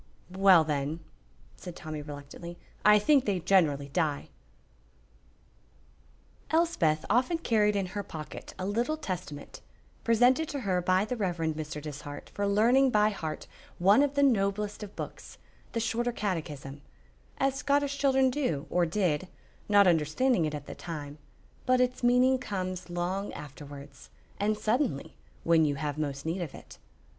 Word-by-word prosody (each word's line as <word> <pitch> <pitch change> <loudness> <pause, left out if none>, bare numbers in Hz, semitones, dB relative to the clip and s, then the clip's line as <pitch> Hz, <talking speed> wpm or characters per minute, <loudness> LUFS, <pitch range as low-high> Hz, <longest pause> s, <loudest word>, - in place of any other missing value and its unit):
"Well, 190 -4 +6
then," 150 +1 -2 0.6
said 175 -2 -9
Tommy, 155 -3 -6
reluctantly, 145 +4 -9 0.3
"I 210 0 +7
think 265 +6 +3
they 195 -3 0
generally 160 -6 +2
die." 150 -1 -1 2.2
Elspeth 315 - +2
often 250 - +2
carried 210 -8 +2
in 195 -1 0
her 205 - -2
pocket 155 -6 -9
a 185 - -4
little 235 +10 0
Testament, 175 - -6 0.4
presented 245 +7 +3
to 285 -2 -4
her 185 -5 0
by 185 +3 +2
the 250 - -3
Rev. 190 -6 -2 0.2
Mr. 155 -1 -5
Dishart 145 -1 -8
for 200 0 -2
learning 240 +7 +4
by 210 -2 +3
heart 160 -6 -5 0.3
one 195 +9 +5
of 285 -1 +1
the 280 - +3
noblest 210 -4 +1
of 205 -1 -8
books, - - -8 0.4
the 230 - 0
Shorter 235 +1 0
Catechism, 150 - -4 0.6
as 270 -1 +1
Scottish 280 +1 0
children 265 -2 +3
do 165 - -1
or 175 -1 +2
did, 180 -2 0 0.4
not 205 -1 +6
understanding 170 - +2
it 155 -1 -2
at 145 -1 -7
the - - -7
time, 150 -3 -7 0.5
but 255 0 +4
its 250 0 +1
meaning 250 +1 +4
comes 185 -6 -4
long 180 +3 -2
afterwards 140 - -10 0.3
and 210 +1 +1
suddenly, 220 - -1 0.3
when 165 -1 +4
you 145 -2 +1
have 150 0 -3
most 140 -2 -3
need 170 +3 -2
of 165 -5 -5
it. - - -13
190 Hz, 150 wpm, -29 LUFS, 155-240 Hz, 2.2 s, I